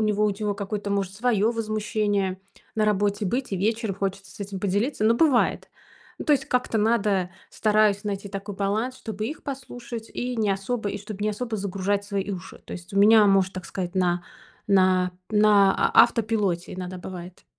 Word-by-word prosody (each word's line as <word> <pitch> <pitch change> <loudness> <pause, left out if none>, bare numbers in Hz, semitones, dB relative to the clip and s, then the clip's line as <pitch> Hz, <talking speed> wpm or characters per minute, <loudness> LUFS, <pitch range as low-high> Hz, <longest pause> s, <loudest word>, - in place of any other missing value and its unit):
него 210 -1 +2
ут 200 -1 0
его 210 -1 -1
какое-то 200 0 -4
может 195 -1 -1
своё 220 0 +2
возмущение 210 -4 -1 0.4
на 215 - +3
работе 205 0 +1
быть, 245 +3 -2
и - - 0
вечер 220 +2 0
хочется 195 0 -4
с - - -14
этим 195 -1 -5
поделиться. 205 +5 0
Ну 225 +2 +5
бывает. 275 -2 +2 0.5
Ну - - -5
то 300 - +4
есть 270 -2 +1
как-то 250 -3 0
надо, 210 -4 +1 0.2
стараюсь 210 -2 +2
найти 200 -1 -4
такой 200 +1 -6
баланс, 215 +6 -1
чтобы 215 -3 -5
их 300 +6 -6
послушать 245 -4 -7
и 250 0 -3
не 215 -3 +1
особо 205 +3 -2
и 205 - -4
чтоб 205 0 -8
не 210 - +1
особо 220 +1 -3
загружать 200 +1 -1
свои 200 -1 -3
уши. 180 -4 -7
То - - -9
есть 175 +1 -9
у 200 - +1
меня, 215 +1 +7
можно 195 -1 +3
так 185 -1 -6
сказать, 180 -1 -4
на 180 -2 +1 0.4
на 185 -2 +3 0.2
на 210 -2 +5
а - - +6
автопилоте 210 -6 0
иногда 180 0 -6
бывает. 180 -1 -9
205 Hz, 185 wpm, -25 LUFS, 195-220 Hz, 0.5 s, меня